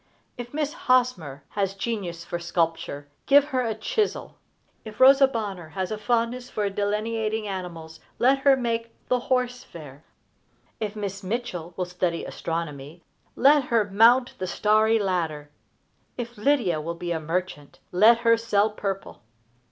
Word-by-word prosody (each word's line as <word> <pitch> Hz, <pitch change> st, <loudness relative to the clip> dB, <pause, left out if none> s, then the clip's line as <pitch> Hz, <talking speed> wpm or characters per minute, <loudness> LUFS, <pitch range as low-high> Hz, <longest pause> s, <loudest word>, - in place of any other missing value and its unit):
If 245 Hz, 0 st, -8 dB
Miss 300 Hz, 0 st, -2 dB
Hosmer 235 Hz, -, 0 dB
has 195 Hz, -1 st, -2 dB
genius 195 Hz, -6 st, -4 dB
for 175 Hz, -, -4 dB
sculpture, 165 Hz, -4 st, -2 dB, 0.2 s
give 285 Hz, 0 st, +6 dB
her 260 Hz, -3 st, 0 dB
a 225 Hz, -3 st, -2 dB
chisel. 415 Hz, -, -2 dB, 0.5 s
If 215 Hz, -1 st, -10 dB
Rosa 270 Hz, +1 st, +7 dB
Bonheur 200 Hz, -9 st, -5 dB
has 190 Hz, 0 st, -3 dB
a 215 Hz, -, -2 dB
fondness 240 Hz, +3 st, -1 dB
for 205 Hz, -2 st, -2 dB
delineating 215 Hz, +2 st, -2 dB
animals, 170 Hz, -4 st, -7 dB, 0.2 s
let 270 Hz, +2 st, +3 dB
her 270 Hz, -1 st, +4 dB
make 230 Hz, -2 st, -2 dB, 0.2 s
"The 250 Hz, -, +2 dB
Horse 250 Hz, 0 st, -1 dB
Fair." 145 Hz, -3 st, -12 dB, 0.8 s
If 215 Hz, -1 st, -3 dB
Miss 200 Hz, -2 st, -5 dB
Mitchell 185 Hz, -5 st, -4 dB
will 180 Hz, -, -1 dB
study 180 Hz, -1 st, -2 dB
astronomy, 165 Hz, -1 st, -5 dB, 0.3 s
let 280 Hz, +1 st, +5 dB
her 225 Hz, -5 st, +1 dB
mount 240 Hz, +5 st, +5 dB
the 185 Hz, -, -3 dB
starry 215 Hz, +3 st, +3 dB
ladder. 165 Hz, -7 st, -2 dB, 0.7 s
If 240 Hz, -1 st, -5 dB
Lydia 210 Hz, -, +1 dB
will 170 Hz, +2 st, -4 dB
be 175 Hz, +1 st, -5 dB
a 165 Hz, -, -1 dB
merchant, 160 Hz, -2 st, -4 dB
let 220 Hz, +6 st, +5 dB
her 230 Hz, -1 st, +4 dB
sell 220 Hz, -2 st, +1 dB
purple. 195 Hz, -2 st, -5 dB
210 Hz, 145 wpm, -25 LUFS, 175-240 Hz, 0.8 s, Rosa